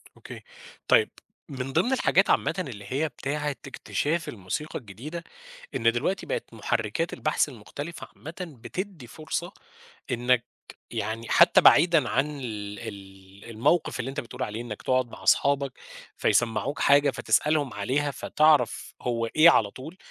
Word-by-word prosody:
أوكي، - - -10 0.5
طيب - - +5 0.4
من 135 -1 -5
ضِمن 225 +11 +2
الحاجات 265 - +3
عامةً - - +2
اللي 105 -6 -9
هي 150 +4 0
بتاعة 150 +1 -3 0.2
اكتشاف 160 +4 -2
الموسيقى 110 +9 -5
الجديدة، 135 - -8 0.5
إن 115 0 +3
دلوقتي 150 +11 -1
بقت - - -4
محرّكات 110 +7 -1
البحث 155 -1 0
المختلفة 145 +7 -8
عامةً 160 +3 -10 0.3
بتدّي 180 -3 -6
فرصة 160 +7 -5 0.6
إنّك 125 0 +2 0.5
يعني 115 +1 -4
حتى - - +6
بعيدًا 165 -5 +6
عن 145 +1 0
ال 105 -5 -6
ال 95 -2 -11
الموقِف 135 +6 +1
اللي 120 - -2
أنت 135 - -4
بتقول 120 - -6
عليه 110 +2 -4
إنّك 110 -3 -7
تقعُد 130 -1 +1
مع - - -11
أصحابك 140 -2 +3 0.4
فيسمّعوك 120 +4 +1
حاجة 140 0 +5
فتسألهم 150 -5 +1
عليها 135 +8 -1
فتعرف 150 -5 +2
هو 115 -2 -1
إيه 155 +8 +6
على 105 -9 +3
طول، 155 - -10
130 Hz, 135 wpm, -26 LUFS, 115-150 Hz, 0.6 s, حتى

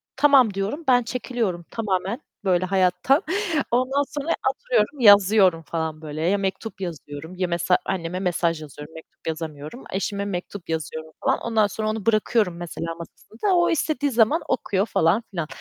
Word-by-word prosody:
tamam 265 -6 +5
diyorum, 205 +12 -3
ben 245 -1 +5
çekiliyorum 230 -8 -3
tamamen 205 - -2 0.2
böyle 185 -1 +2
hayattan. 190 - +2 0.5
Ondan 260 +4 +2
sonra 290 +3 -5 0.2
oturuyorum, 250 +2 0
yazıyorum 200 -5 +6
falan 160 -1 -4
böyle, 155 0 -6
ya 185 +5 +2
mektup 195 +1 -4
yazıyorum, 160 -1 -7
ya 185 -1 -1
mesela 170 +1 +2
anneme 180 -1 -3
mesaj 170 -3 0
yazıyorum, 150 +1 -10
mektup 160 0 -14
yazamıyorum, 155 - -5
eşime 200 +1 -2
mektup 185 -2 -6
yazıyorum 160 0 -4
falan. - - +3
Ondan 220 -3 +2
sonra 215 +2 -3
onu 215 -1 -3
bırakıyorum 215 -4 +2
mesela 165 -1 -5
masasında, 225 - -3
o 345 0 +3
istediği 290 -3 0
zaman 235 +8 +3
okuyor 200 -4 0
falan 195 +3 +2
filan 170 -5 -3
195 Hz, 150 wpm, -23 LUFS, 170-230 Hz, 0.5 s, yazıyorum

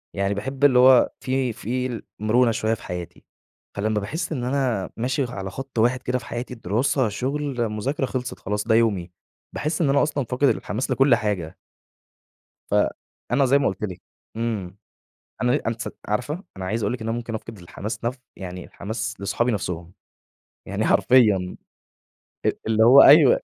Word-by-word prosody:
يعني 100 0 0
باحب 135 +7 -1
اللي 125 -3 +5
هو 130 -1 +6
في 130 -2 -1
في 125 +1 -3 0.2
المرونة 115 +2 +3
شوية 110 0 0
في - - -6
حياتي. 90 -1 -7 0.5
فلمّا 105 +1 0
باحس 160 - -4
إن 125 -5 -2
أنا 125 -7 0
ماشي 130 +4 0
على 95 -4 -5
خط 135 -2 -5
واحد 125 +2 +2
كده 125 +1 0
في 120 - -13
حياتي، 120 +1 -5
الدراسة، 115 +3 0
شغل، 130 +1 -2
مذاكرة، 130 +7 -2
خلصت 125 -1 -4
خلاص 105 +1 -2
ده 110 - +4
يومي. 100 -7 +1 0.4
باحس 155 +3 -2
إن 145 - +3
أنا 140 +1 +4
أصلًا 145 -3 -1
فاقد 130 +3 +2
الحماس 115 +6 -2
لكل 135 -2 +5
حاجة. 100 -7 -3 1.1
فأنا 130 +4 0
زي 140 +3 +4
ما 140 - 0
قلت 95 +2 -4
لكِ، 90 -4 -5 0.4
إمم، 105 -5 -3 0.7
أنا 125 0 +2
أنتِ 115 0 -2
س - - -3 0.2
عارفة 145 - -2
أنا 95 - -5
عايز 110 +4 -2
أقول - - 0
لِك 125 -2 -5
إن 115 - -2
ممكن 115 -1 -4
أفقد 110 0 -7
الحماس 100 +6 -7
نف 125 +2 -2 0.2
يعني 90 -2 -7
الحماس 110 +1 -5
لصحابي 120 +5 0
نفسهم، 90 -4 -4 0.8
يعني - - -1
حرفيًا. 105 -8 +4 0.9
أ - - +4
اللي 110 0 +3
هو 130 +4 +9
أيوه، 145 -2 +8
115 Hz, 165 wpm, -23 LUFS, 105-130 Hz, 1.1 s, هو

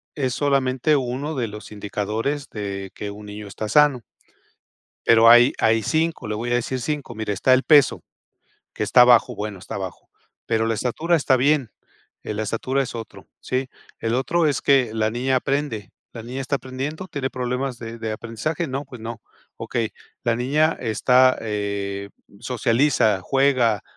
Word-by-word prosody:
es 130 -3 -1
solamente 140 0 +1
uno 135 +3 -2
de 120 -3 -1
los 105 +1 -10
indicadores 105 +7 -3
de 100 -2 -5
que 105 - -5
un 105 +1 -10
niño 105 0 -8
está 105 +2 -5
sano". 145 -3 +4 1.1
Pero 115 0 +7
hay, 120 +2 +7
hay 110 -1 +3
5, 160 -4 -1
le 105 - -2
voy 120 +3 -3
a - - +3
decir 125 +1 -2
5. 145 -1 -3
Mire: 110 -2 -4
"Está 130 +6 +3
el 130 - +4
peso, 145 -3 +4 0.7
que - - -5
está 125 +4 +6
bajo, 125 0 +5
bueno, 105 -2 -5
está - - -7
bajo, - - -7 0.4
pero 115 -1 +1
la 115 - +1
estatura 155 +10 0
está 135 -5 +3
bien, 135 -2 +2 0.5
eh, - - -4
la 105 +1 -3
estatura 130 +5 -1
es 130 - -6
otro", 115 -1 -9
¿sí? 130 +1 -2 0.3
"El 115 +1 -1
otro 160 +6 +1
es 145 -3 0
que 130 -5 +3
la 110 0 +1
niña 130 +3 0
aprende, 130 -6 -2 0.2
¿la 115 - -7
niña 125 +3 -6
está 140 +1 -1
aprendiendo, 135 +7 -5
tiene 140 -6 -3
problemas 125 0 -3
de 115 0 -8
de 110 -1 -3
aprendizaje?". 115 +10 -3
"No, 135 0 -4
pues 125 -4 -11
no". 115 0 -6 0.4
"Okey, 115 -2 -2 0.3
¿la 115 -1 +1
niña 150 +6 +2
está, 125 +3 +4
eh, 100 -2 -3 0.3
socializa, 120 -3 +2
juega, 130 -3 +2
125 Hz, 170 wpm, -22 LUFS, 110-135 Hz, 1.1 s, Pero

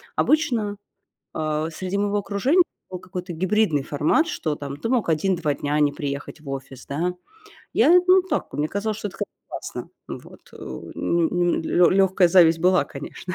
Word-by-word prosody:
Обычно, 235 -10 +1 0.6
а, 155 0 -1
среди 185 +4 -4
моего 205 0 0
окружения 210 - +2 0.3
был 185 - -6
какой-то 180 0 -7
гибридный 185 -3 +1
формат, 150 - +1
что 160 - -2
там 140 -1 -6
ты 230 - -4
мог 245 -9 +1
1-2 160 -2 +1
дня 145 +1 -1
не 145 -1 +3
приехать 145 +2 -5
в 145 - -10
офис, 135 -1 -7
да. 170 +6 -1 0.6
Я, 355 +3 +6
ну, 370 0 +6
так, 375 - -3
мне 150 +1 -1
казалось, 215 +3 -2
что 210 - -4
это 195 - -13 0.3
классно, - - -7 0.2
вот. - - -9
Ну - - -8
ну 175 +1 +1
лё 175 +2 +3
лёгкая 190 -1 +4
зависть 170 -2 +6
была, 180 -3 +4
конечно. 145 +7 -8
180 Hz, 160 wpm, -23 LUFS, 150-205 Hz, 0.6 s, Я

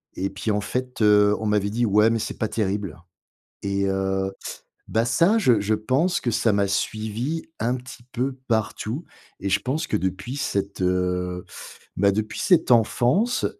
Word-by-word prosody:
et 95 +1 -2
puis 100 +3 -3
en 105 0 0
fait, 125 +4 -4
heu, 105 -1 +5
on 110 - -2
m'avait 105 -1 +1
dit: 120 +2 +1
«ouais 105 +2 +5
mais 115 - +1
c'est - - -4
pas 110 - -1
terrible» 100 -7 -2 0.6
et 100 0 0
heu. 95 0 0 0.6
Bah, 115 +1 +1
ça 170 - +3
je 125 - +4
je 105 +2 +1
pense 135 - +1
que 120 - -1
ça 115 0 +2
m'a 100 0 +2
suivi 110 +9 -2 0.2
un 120 +3 +1
petit 125 -1 -11
peu 130 +2 -2
partout 110 +5 -1 0.4
et 100 - -2
je 100 - +3
pense 150 +6 -2
que - - 0
depuis 95 +8 -3
cette, 100 -8 -2
heu, 90 0 0 0.5
bah, 100 +1 +4
depuis 110 +2 -3
cette 170 -7 +3
enfance 125 - +3
110 Hz, 170 wpm, -24 LUFS, 100-125 Hz, 0.6 s, heu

